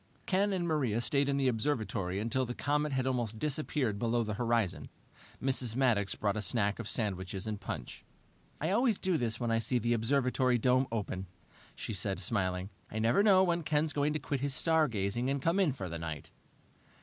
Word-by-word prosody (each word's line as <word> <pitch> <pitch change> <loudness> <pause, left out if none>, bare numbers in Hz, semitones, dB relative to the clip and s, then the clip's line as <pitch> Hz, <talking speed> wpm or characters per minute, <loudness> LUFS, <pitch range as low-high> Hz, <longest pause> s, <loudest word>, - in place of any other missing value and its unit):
Ken 195 +2 +2
and 180 -3 -1
Maria 135 -9 +1
stayed 140 +5 +1
in 140 - +1
the 135 -1 +2
observatory 110 -7 -1
until 115 +5 0
the 125 -1 -4
comet 150 +1 0
had 130 -1 0
almost 120 -4 -1
disappeared 135 -5 -1
below 115 +1 +1
the 105 -1 -3
horizon. 115 -3 0 0.5
Mrs. 130 -3 -1
Maddox 115 -7 +2
brought 100 -1 0
a 110 - -1
snack 105 0 +1
of 115 - -4
sandwiches 95 -3 -2
and 105 -2 -4
punch. 60 - -6 0.6
"I 160 +4 -1
always 230 0 +3
do 185 -2 0
this 120 -5 -1
when 120 -2 -1
I 115 - +2
see 120 +3 +1
the 120 0 +1
observatory 125 +1 +2
dome 130 +2 +3
open," 95 -4 -3 0.5
she - - -5
said, 95 -1 -2
smiling. 95 0 -1 0.2
"I 110 - -6
never 115 - +3
know 195 -3 +6
when 170 -2 +1
Ken's 155 0 0
going 145 +1 +1
to - - 0
quit 140 -1 -2
his 140 0 -1
stargazing 125 - +1
and 140 0 0
come 165 +7 +1
in 185 -7 +3
for 125 -8 -5
the 85 -1 -5
night." 80 -3 -6
120 Hz, 195 wpm, -32 LUFS, 105-145 Hz, 0.6 s, know